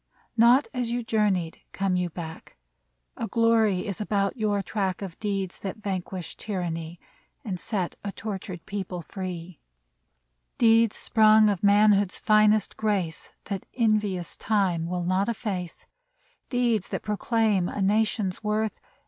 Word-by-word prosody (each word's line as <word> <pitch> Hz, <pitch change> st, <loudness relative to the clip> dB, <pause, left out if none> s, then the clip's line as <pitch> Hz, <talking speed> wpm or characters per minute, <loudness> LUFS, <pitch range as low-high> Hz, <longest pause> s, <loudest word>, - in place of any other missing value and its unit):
Not 240 Hz, +4 st, +5 dB
as 250 Hz, -2 st, -1 dB
you 240 Hz, 0 st, -1 dB
journeyed 205 Hz, -7 st, 0 dB
come 195 Hz, -1 st, 0 dB
you 180 Hz, -1 st, 0 dB
back; 160 Hz, -, -9 dB, 0.6 s
A 225 Hz, -, -3 dB
glory 225 Hz, -5 st, +2 dB
is 200 Hz, -1 st, -4 dB
about 200 Hz, -1 st, 0 dB
your 210 Hz, -4 st, 0 dB
track 190 Hz, -1 st, -1 dB
i6i -, -, -17 dB
WELCOME -, -, -2 dB
Of 175 Hz, -3 st, -10 dB
deeds 195 Hz, -3 st, -3 dB
that 195 Hz, +1 st, -5 dB
vanquished 190 Hz, -4 st, -5 dB
tyranny 170 Hz, -4 st, -4 dB, 0.5 s
And 190 Hz, -5 st, -3 dB
set 185 Hz, -3 st, -3 dB
a 200 Hz, -, -3 dB
tortured 190 Hz, -5 st, -6 dB
people 190 Hz, -4 st, -5 dB
free: 180 Hz, -3 st, -7 dB, 1.0 s
Deeds, 230 Hz, -1 st, +4 dB
sprung 215 Hz, -1 st, +5 dB
of 195 Hz, -, -3 dB
manhood's 205 Hz, -1 st, +4 dB
finest 215 Hz, 0 st, +3 dB
grace, 195 Hz, -7 st, -2 dB
That 195 Hz, -3 st, -5 dB
envious 210 Hz, -6 st, +1 dB
Time 190 Hz, -6 st, 0 dB
will 180 Hz, 0 st, -2 dB
not 185 Hz, +4 st, +1 dB
efface; 190 Hz, -6 st, -4 dB, 0.6 s
Deeds 240 Hz, -6 st, +1 dB
that -, -, -4 dB
proclaim 210 Hz, -3 st, +1 dB
a -, -, -5 dB
Nation's 205 Hz, -1 st, +1 dB
worth. 215 Hz, 0 st, -1 dB
200 Hz, 140 wpm, -26 LUFS, 185-215 Hz, 1.0 s, Not